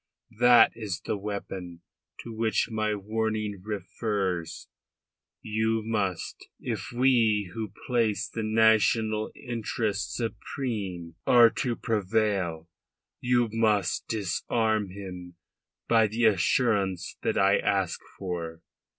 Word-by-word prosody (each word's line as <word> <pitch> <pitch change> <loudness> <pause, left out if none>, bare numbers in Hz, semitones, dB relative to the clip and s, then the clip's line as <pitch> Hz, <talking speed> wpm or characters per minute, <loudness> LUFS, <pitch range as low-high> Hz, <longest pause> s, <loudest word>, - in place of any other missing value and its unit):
That 120 -1 +7
is 105 -6 -4
the - - -1
weapon 95 -4 -6 0.4
to 115 - -8
which 110 -2 0
my 110 -1 0
warning 110 -1 -2
refers. 95 -3 -3 0.8
You 110 +1 0
must 100 -6 -2
if - - -4
we 115 -6 +2
who 110 -3 -4
place 110 -4 +1
the 115 - -5
national 110 0 +3
interest 110 -4 -3
supreme 100 -8 -4
are 120 -2 +7
to 120 -3 -2
prevail 100 -7 -1 0.5
you 120 -1 +2
must 110 -4 +1
disarm 110 +1 0
him 90 -2 -9 0.5
by 115 -2 +4
the 115 +3 0
assurance 100 -3 +1
that - - 0
I 95 +1 +4
ask 95 -3 0 0.2
for. 85 -3 -5
105 Hz, 105 wpm, -27 LUFS, 95-115 Hz, 0.8 s, That